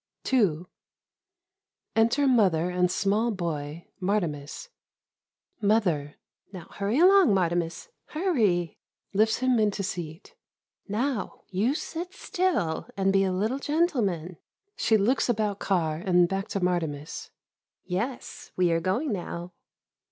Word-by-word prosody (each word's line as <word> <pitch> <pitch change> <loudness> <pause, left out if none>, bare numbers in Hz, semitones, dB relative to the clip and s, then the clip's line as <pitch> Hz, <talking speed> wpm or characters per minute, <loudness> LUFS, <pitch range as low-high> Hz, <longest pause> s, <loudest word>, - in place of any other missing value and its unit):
ii 180 -10 +3 1.3
Enter 235 +6 +3
Mother 185 -9 +3
and 180 0 +2
small 210 +5 +1
boy, 165 -5 -4 0.2
Martimas 175 - -2 0.9
Mother 180 -9 +1 0.4
Now 185 -4 -10
hurry 205 +5 -1
along, 365 - +6
Martimas, 175 - -1 0.2
hurry! 220 - 0 0.3
[Lifts 220 +2 +3
him 255 -2 +3
into 210 -2 +1
seat.] 170 -4 -6 0.5
Now, 230 +1 -2
you 215 +9 +1
sit 350 +4 -5
still 345 - -1
and 195 0 +2
be 195 0 +4
a 190 - +1
little 215 +9 -1
gentle 300 -1 +1
man. 175 -3 -2 0.4
[She 220 - +3
looks 240 +6 +1
about 210 -3 0
car, 165 -5 0
and 180 -2 +4
back 195 +2 -3
to 200 - -2
Martimas.] 165 -5 -2 0.6
Yes, 230 +8 -4
we 180 -2 +2
are 165 0 +1
going 235 - 0
now. 175 -1 -5
195 Hz, 120 wpm, -27 LUFS, 175-235 Hz, 1.3 s, along